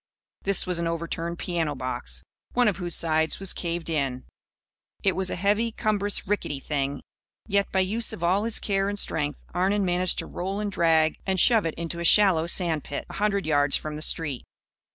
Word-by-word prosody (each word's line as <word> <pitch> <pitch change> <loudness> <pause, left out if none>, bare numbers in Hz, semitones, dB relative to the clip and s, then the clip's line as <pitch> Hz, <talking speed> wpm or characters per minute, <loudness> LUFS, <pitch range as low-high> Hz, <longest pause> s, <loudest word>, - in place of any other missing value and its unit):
This 200 -1 +2
was 180 -2 0
an 170 - 0
overturned 170 0 -3
piano 165 -5 -2
box, 65 - -3 0.3
one 245 -1 +3
of 200 -5 +1
whose 175 -2 -2
sides 160 -1 +1
was 195 -1 -1
caved 170 -1 -3
in. 135 -6 -2 0.8
It 195 - +2
was 190 -1 0
a - - -2
heavy, 205 +5 +1
cumbrous 205 -3 0
rickety 190 -8 -1
thing. 140 -1 -3 0.4
Yet, 200 -2 0
by 190 - +2
use 215 +5 0
of 175 - -6
all 190 +5 +2
his 230 - 0
care 195 -1 0
and 205 - -3
strength, 150 -6 -1
Arnon 195 +3 +1
managed 180 0 +1
to - - -2
roll 190 +3 -4
and 210 -1 -2
drag 160 -3 +2
and 190 -1 +1
shove 220 -2 +4
it 160 - -4
into 170 0 -5
a - - -3
shallow 175 -3 +5
sand 170 -4 +1
pit, 145 - -5
a - - -7
hundred 200 -2 0
yards 145 -2 +3
from 155 -1 -6
the 150 - -6
street. 150 -5 0
175 Hz, 195 wpm, -26 LUFS, 160-200 Hz, 0.8 s, shallow